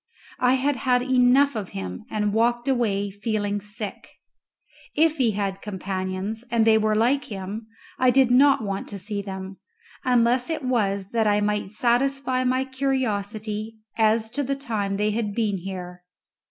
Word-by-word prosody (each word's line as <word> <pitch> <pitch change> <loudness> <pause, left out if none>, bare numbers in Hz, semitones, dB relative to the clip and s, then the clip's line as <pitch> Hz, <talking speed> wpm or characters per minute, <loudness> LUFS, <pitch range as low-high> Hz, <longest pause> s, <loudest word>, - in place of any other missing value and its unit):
I 250 +1 +4
had 270 +1 0
had 250 -1 +2
enough 260 +2 +4
of 205 -4 -4
him, 90 -1 -6
and 210 -1 -1
walked 240 +3 +1
away 205 -6 +1
feeling 205 0 -2
sick. 210 0 -7 0.8
If 315 +1 +3
he 235 -5 +2
had 195 -1 -2
companions, 190 +2 -4
and 230 -2 +2
they 225 -1 +6
were 215 0 +1
like 245 +6 +2
him, 205 +2 -6 0.3
I 255 - +5
did 260 -1 +4
not 270 -1 +5
want 195 -1 -3
to 200 - -6
see 200 +1 -4
them, 190 -1 -7 0.5
unless 245 +1 +2
it 320 -3 -2
was 200 -6 0
that 225 -2 +2
I 205 0 +3
might 210 -1 -1
satisfy 255 +4 +1
my 255 +1 +1
curiosity 220 -5 -2 0.2
as 220 0 +2
to 285 - -1
the 275 0 -1
time 215 -8 -2
they 210 +1 +1
had 210 -2 -2
been 210 -4 0
here. 180 -1 -7
220 Hz, 160 wpm, -24 LUFS, 200-250 Hz, 0.8 s, they